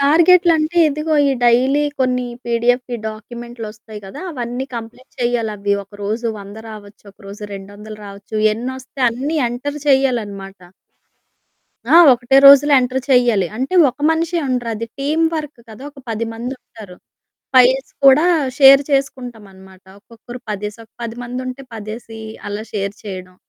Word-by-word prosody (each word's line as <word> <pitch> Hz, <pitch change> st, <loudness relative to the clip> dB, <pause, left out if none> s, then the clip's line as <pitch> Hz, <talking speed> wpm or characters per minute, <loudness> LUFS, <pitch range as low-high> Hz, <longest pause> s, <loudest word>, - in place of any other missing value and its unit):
టార్గెట్లంటే 335 Hz, +2 st, +4 dB
ఇదిగో 305 Hz, +2 st, -2 dB
ఈ -, -, +2 dB
డైలీ 260 Hz, +5 st, +3 dB, 0.2 s
కొన్ని 250 Hz, -1 st, +1 dB, 0.2 s
పిడిఎఫ్ 245 Hz, +2 st, 0 dB, 0.2 s
డాక్యుమెంట్లు 235 Hz, +1 st, -8 dB
వొస్తాయి 215 Hz, 0 st, -12 dB
కదా! 195 Hz, -, -9 dB
అవన్నీ 245 Hz, -2 st, -4 dB
కంప్లీట్ 230 Hz, +3 st, -10 dB
చేయాలవి. 215 Hz, -4 st, -1 dB
ఒకరోజు 205 Hz, +4 st, -5 dB
100 200 Hz, +1 st, -11 dB
రావచ్చు, 210 Hz, -1 st, -12 dB
ఒకరోజు 200 Hz, +1 st, -11 dB
200 205 Hz, +2 st, -10 dB
రావచ్చు. 200 Hz, +2 st, -11 dB, 0.2 s
ఎన్నొస్తే 260 Hz, +4 st, -7 dB
అన్ని 275 Hz, +7 st, -3 dB
ఎంటర్ 285 Hz, +5 st, -5 dB
చేయాలనమాట. 210 Hz, -8 st, 0 dB, 1.3 s
ఆ! -, -, +9 dB, 0.2 s
ఒకటే 245 Hz, +2 st, +1 dB
రోజులో 280 Hz, +1 st, +8 dB
ఎంటర్ 255 Hz, +1 st, -1 dB
చేయాలి. 240 Hz, -7 st, +3 dB
అంటే 265 Hz, +9 st, -3 dB, 0.2 s
ఒక 255 Hz, -, -27 dB
మనిషే 335 Hz, +2 st, 0 dB
ఉండరు 245 Hz, -2 st, -2 dB
అది 230 Hz, +2 st, -5 dB
టీమ్ 305 Hz, +4 st, 0 dB
వర్క్ 300 Hz, -4 st, -5 dB
కదా! 220 Hz, +3 st, -12 dB
ఒక 280 Hz, -, -18 dB
10 225 Hz, +1 st, -2 dB
మందుంటారు. 225 Hz, -5 st, -9 dB, 0.6 s
ఫైల్స్ 260 Hz, +1 st, +4 dB
కూడా 275 Hz, +5 st, +7 dB, 0.3 s
షేర్ 275 Hz, 0 st, +8 dB
చేసుకుంటామనమాట. 215 Hz, -9 st, -4 dB, 0.2 s
ఒక్కొక్కరు 235 Hz, +3 st, -12 dB
పదేసి, 210 Hz, +1 st, -5 dB
ఒక 225 Hz, -, -23 dB
10 230 Hz, -1 st, -5 dB
మంది 245 Hz, +1 st, -5 dB
ఉంటే, 255 Hz, +2 st, -7 dB
పదేసి 225 Hz, +1 st, -8 dB, 0.3 s
అలా 205 Hz, +1 st, -5 dB
షేర్ 200 Hz, -1 st, -2 dB
చేయడం. 185 Hz, -3 st, -8 dB
240 Hz, 135 wpm, -18 LUFS, 210-270 Hz, 1.3 s, ఆ